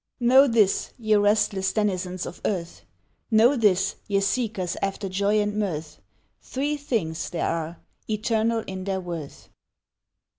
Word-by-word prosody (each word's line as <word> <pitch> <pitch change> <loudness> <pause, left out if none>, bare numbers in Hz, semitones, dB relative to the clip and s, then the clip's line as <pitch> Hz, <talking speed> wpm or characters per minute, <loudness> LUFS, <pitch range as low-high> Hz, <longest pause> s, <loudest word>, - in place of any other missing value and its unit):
KNOW 260 +3 +6
this, 220 -5 +2
ye 215 -3 +1
restless 205 -2 +2
denizens 185 -4 -1
of - - -9
earth, 170 - -3 0.4
Know 235 +4 +5
this, 200 -6 +2
ye 200 -1 +2
seekers 200 -3 -1
after 195 0 -2
joy 200 +3 +1
and 205 0 -1
mirth, 160 -7 -3 0.4
Three 285 +3 -2
things 215 - -2
there 175 - -2
are, 165 +1 -3 0.3
eternal 220 +1 0
in 185 -1 -6
their 195 -1 -1
worth. 170 -5 -7
205 Hz, 135 wpm, -25 LUFS, 185-220 Hz, 0.4 s, KNOW